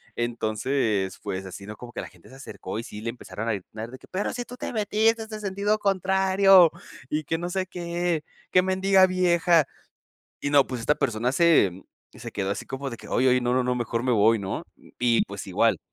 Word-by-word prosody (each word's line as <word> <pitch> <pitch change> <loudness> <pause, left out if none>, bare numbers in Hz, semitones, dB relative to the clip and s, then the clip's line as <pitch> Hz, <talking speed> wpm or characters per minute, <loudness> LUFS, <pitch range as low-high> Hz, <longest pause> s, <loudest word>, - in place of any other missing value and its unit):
Entonces, 110 -3 -1
pues, 95 -2 -4
así, 95 +1 -9
¿no? 105 +1 -8
Como 120 +2 -10
que - - -4
la - - -8
gente 90 -2 -20
se 130 - -14
acercó, 120 -7 -7
y 115 - -3
sí 105 -2 -9
le 115 - -3
empezaron 115 -2 -6
a - - +2
gritar 110 +3 -7
de 130 - -10
que: - - -18
"Pero 190 +2 -1
si 245 0 -5
tú 250 - -10
te - - -5
metiste 220 +1 +1
en 215 -1 -8
sentido 205 +2 0
contrario 190 -2 +5 0.4
y 155 +1 -1
que 160 +3 -2
no 175 +1 -3
sé 190 +1 -1
qué, 175 -2 -2 0.3
qué 185 - +6
mendiga 190 0 +4
vieja". 175 -3 +3 0.8
Y 140 - -2
no, 145 -2 +5
pues, 125 -2 -4
esta 150 - +3
persona 120 -1 0
se 165 - +4 0.4
se 115 0 -9
quedó 100 -1 -2
así - - -5
como 135 +1 -4
de 115 - -7
que: - - -13
"Ay, 130 - +2
ay, 125 0 +4
no, 120 0 +1
no, 130 - +2
no, 125 0 +1
mejor 120 -1 -2
me 130 - +1
voy, 110 0 +4
¿no? 95 -2 -4 0.4
Y, 120 -2 +3
pues, 100 0 -8
igual. 100 0 +2
135 Hz, 220 wpm, -25 LUFS, 115-185 Hz, 0.8 s, qué